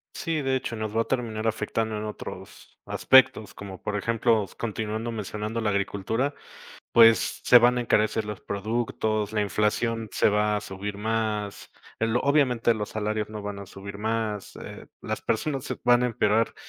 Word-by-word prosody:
Sí, 160 -2 -2
de 135 0 +1
hecho, 120 -2 -3
nos 110 -1 -4
va 115 - +3
a - - +1
terminar 115 -4 -2
afectando 110 0 -1
en 105 - -4
otros 105 -1 -9
aspectos, 120 -5 +4
como 95 -2 -9
por 105 - -3
ejemplo, 115 0 +2
s 95 - -11
continuando 110 +1 -3
mencionando 105 +1 -4
la 105 -2 0
agricultura, 100 +8 -1 0.6
pues 115 -1 +5
se 125 - +8
van 125 +1 +4
a - - +1
encarecer 110 -1 +1
los 105 -2 -6
productos, 110 0 -2
la 105 - +1
inflación 110 +2 0
se - - +3
va 105 0 +2
a - - -2
subir 100 0 -6
más, 105 -2 -2 0.3
el 115 +1 +1
obviamente 130 -5 +3
los 105 -1 -4
salarios 105 0 -2
no 105 -1 -7
van 100 -1 -5
a 100 - -8
subir 100 +1 -9
más, 110 -2 -2
eh, - - -9 0.2
las - - -3
personas 135 +4 -1
se - - -4
van 120 0 +4
a - - +3
empeorar 115 -1 +1
110 Hz, 175 wpm, -26 LUFS, 105-115 Hz, 0.6 s, se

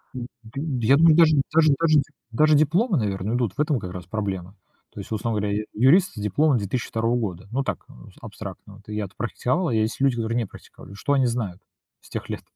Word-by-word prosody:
М, 120 -2 -5 0.2
д 115 +5 -7 0.3
Я 140 - +6
думаю, 160 -1 +6
даже 160 -2 +6 0.2
даже 155 -2 +5
даже 165 -1 +3
де - - +1 0.3
даже 155 +6 +4
дипломы, 170 - +2
наверное, 105 0 -1
идут, 120 -6 0
в - - -14
этом 150 -4 +1
как 90 -3 -7
раз 90 0 -7
проблема. 95 -1 -4 0.4
То - - -9
есть, - - -9
условно 110 0 -1
говоря, 100 0 -1
я - - -3
юрист 145 - +4
с - - -7
дипломом 125 +8 +2
2002 115 +2 -1
года. 95 -6 -4
Ну, 135 +3 0
так, - - -4
за - - -15
абстрактно 100 - -9
вот. 105 +1 -19
Я-то 105 -2 -4
практиковал, 130 +8 -1
а 120 - -1
есть 110 +3 0
люди, 135 -2 +3
которые 115 +1 -1
не 120 - 0
практиковали. 100 - -14
Что 105 +8 -1
они 135 -2 +3
знают 110 -7 -3 0.4
с - - -19
тех - - -5
лет? - - -4
115 Hz, 220 wpm, -24 LUFS, 105-145 Hz, 0.4 s, Я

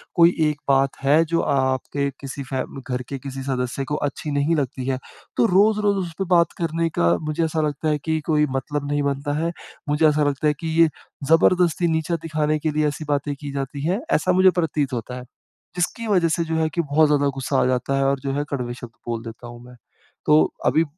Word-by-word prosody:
कोई 170 0 +5
एक 150 -1 -5
बात 135 0 +2
है 145 +4 +5
जो 165 +1 0
आपके 135 0 0
किसी 140 0 -6
फ़ै 130 0 -2 0.3
घर 125 0 -1
के 140 - -4
किसी 135 0 -6
सदस्य 130 0 -2
को - - +1
अच्छी 150 +1 -5
नहीं 145 +3 +1
लगती 130 -2 -2
है, 135 -1 0 0.4
तो 120 - +4
रोज़-रोज़ 205 +1 +3
उसपे 170 +3 -4
बात 170 -1 +4
करने 165 0 -1
का 85 0 +4
मुझे 155 +2 -1
ऐसा 160 0 -1
लगता 150 +2 -2
है 150 - +2
कि 160 -1 0
कोई 150 -2 +3
मतलब 145 +2 -3
नहीं 145 0 +1
बनता 140 +1 -1
है। 165 +1 0 0.4
मुझे 150 +2 +4
ऐसा 150 0 +1
लगता 145 +1 0
है 150 - +3
कि 165 - -4
ये 165 - +6 0.4
जबरदस्ती 175 +1 +4
नीचा 160 +1 0
दिखाने 155 -1 0
के 155 +1 -1
लिए 150 0 +1
ऐसी 150 +1 -4
बातें 145 0 0
की 145 0 -7
जाती 140 +1 -4
हैं, 190 +6 0
ऐसा 185 - +2
मुझे 185 +1 +6
प्रतीत 150 -5 -1
होता 120 +1 -4
है। 125 - -7 0.5
जिसकी 180 +6 -2
वजह 185 -5 +3
से 170 +1 0
जो 160 0 -2
है 160 0 +2
कि 170 +2 -1
बहुत 155 0 +3
ज़्यादा 145 -1 +2
गुस्सा 135 0 -1
आ - - +2
जाता 130 +2 0
है 135 - +2
और 135 0 +1
जो 135 0 -2
है 145 +1 0
कड़वे 125 -3 -3
शब्द 120 -2 -10 0.2
बोल 115 -1 -3
देता 115 +1 -9
हूँ 120 0 -11
मैं। 125 0 -14 0.5
तो 150 +1 +6 0.2
अभी 150 +7 +4
145 Hz, 220 wpm, -22 LUFS, 135-160 Hz, 0.5 s, ये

